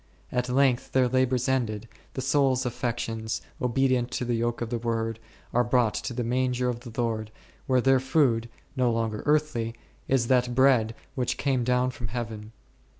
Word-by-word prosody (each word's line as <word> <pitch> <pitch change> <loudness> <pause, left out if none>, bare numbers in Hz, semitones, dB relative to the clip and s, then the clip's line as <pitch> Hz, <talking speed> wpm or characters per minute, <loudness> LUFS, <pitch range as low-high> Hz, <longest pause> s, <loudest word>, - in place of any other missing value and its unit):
At 125 0 -1
length, 130 -1 +2
their 130 -1 +4
labours 130 0 +1
ended, 115 -5 -1 0.3
the 130 - -3
soul's 130 -1 +2
affections, 115 -2 -2 0.2
obedient 125 0 +1
to 125 - -2
the 120 - 0
yoke 120 0 -1
of 120 0 -4
the 120 - -1
Word, 115 -1 -2 0.3
are 120 - +4
brought 120 -3 +2
to - - -4
the 120 - -1
manger 125 +1 0
of 120 -1 -3
the 120 -1 -9
Lord, 110 -2 -1 0.4
where 130 -2 +3
their 135 +1 +4
food, 130 -4 +2 0.3
no 125 -2 +2
longer 115 -2 -1
earthly, 150 -7 +1 0.3
is 130 -3 +2
that 125 0 +2
Bread 125 -4 +4 0.2
which 125 -2 -1
came 135 -3 +1
down 125 +1 +2
from 120 -2 -6
Heaven. 110 -1 -5
125 Hz, 170 wpm, -27 LUFS, 115-130 Hz, 0.4 s, their